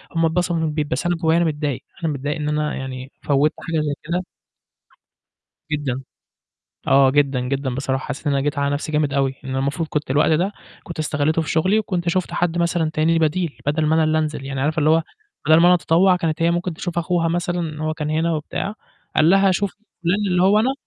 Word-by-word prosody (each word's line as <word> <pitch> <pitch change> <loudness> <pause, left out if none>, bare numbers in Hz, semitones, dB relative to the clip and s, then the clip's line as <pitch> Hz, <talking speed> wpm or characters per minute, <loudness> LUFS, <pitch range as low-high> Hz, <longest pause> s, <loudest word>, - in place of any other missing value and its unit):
هُم 165 0 +3
اتبسطوا 175 +2 0
في - - -1
البيت 150 -1 -1
بس 140 +5 -2
أنا 175 0 +2
جوّايا 165 -1 +2
أنا 170 - +3
متضايق، 150 -4 -2 0.2
أنا 155 - 0
متضايق 145 +2 -3
إن 150 -1 -2
أنا 150 0 -1
يعني 130 0 -6
فوّتّ 145 +1 +2 0.2
حاجة 160 -2 0
زي 150 -1 -1
كده. 175 +3 -2 1.5
جدًا، 135 -4 -2 0.9
آه 135 -1 +6
جدًا، 140 -2 +2
جدًا 130 0 -2
بصراحة 135 0 -2
حسّيت 150 - -5
إن 145 - +2
أنا 140 - +1
جيت 145 +1 -2
على 140 0 +1
نَفْسي 150 +2 -3
جامد 150 -2 +1
أوي، 135 -1 +1
إن 130 - -7
أنا 130 - -1
المفروض 140 +4 -1
كنت 150 -3 -2
الوقت 145 +3 +3
ده 180 +6 +2 0.3
كنت 170 -2 -8
استغليته 155 +1 +1
في 160 - -5
شغلي 185 +7 +2
وكنت 175 -5 -2
شُفت 185 +1 -1
حَد 175 -1 0
مثلًا 170 -2 +1
تاني 165 +1 +2
بديل، 165 0 0
بدل 150 +2 +1
ما 155 - +3
أنا 160 - +3
اللي 155 0 +2
انزل 150 -3 -3
يعني 135 -1 -3
عارفة 155 +3 0
اللي 155 0 +3
هو 165 +1 +4 0.4
بدل 155 0 +7
ما 170 - +5
أنا 180 - +7
أتطوّع 175 +3 +3
كانت 165 -2 -2
هي 170 +1 +3
ممكن 175 +1 -1
تشوف 175 +1 -5
أخوها 170 0 +1
مثلًا 175 +1 -1
إن 155 -3 -4
هو 155 0 -1
كان 150 -1 -4
هنا 160 +2 +1
وبتاع، 165 +6 -3 0.4
قال 155 +1 +5
لها 195 +1 +5
شوفي 195 +1 -1 0.3
فلان 170 +1 +2
اللي 180 -1 +2
هو 200 +3 +5
أنا 255 +5 +2
155 Hz, 225 wpm, -21 LUFS, 145-170 Hz, 1.5 s, بدل